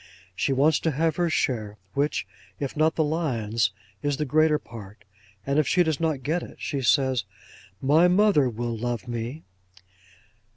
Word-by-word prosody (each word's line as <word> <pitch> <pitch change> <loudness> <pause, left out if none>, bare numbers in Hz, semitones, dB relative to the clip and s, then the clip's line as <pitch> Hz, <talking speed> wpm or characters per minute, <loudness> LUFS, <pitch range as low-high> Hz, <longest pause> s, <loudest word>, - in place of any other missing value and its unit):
She 140 - 0
wants 145 +3 +3
to 165 - 0
have 160 +1 0
her 175 -1 +1
share, 110 -10 -1 0.2
which, 145 +2 0 0.3
if 140 -2 -4
not 155 +1 +2
the 160 - +2
lion's, 115 -9 0 0.3
is 145 -1 -1
the 150 - -1
greater 155 +2 +3
part; 105 -6 -12 0.4
and 140 +2 +1
if 155 - +2
she 180 - +4
does 160 -4 -1
not 155 -5 -1
get 160 +6 0
it, - - -10
she 140 -3 -3
says, 130 -2 +2 0.6
"My 155 +6 +5
mother 180 -7 +4
will 120 0 -3
love 120 +2 -3
me." 120 +6 -5
140 Hz, 165 wpm, -25 LUFS, 120-160 Hz, 0.6 s, My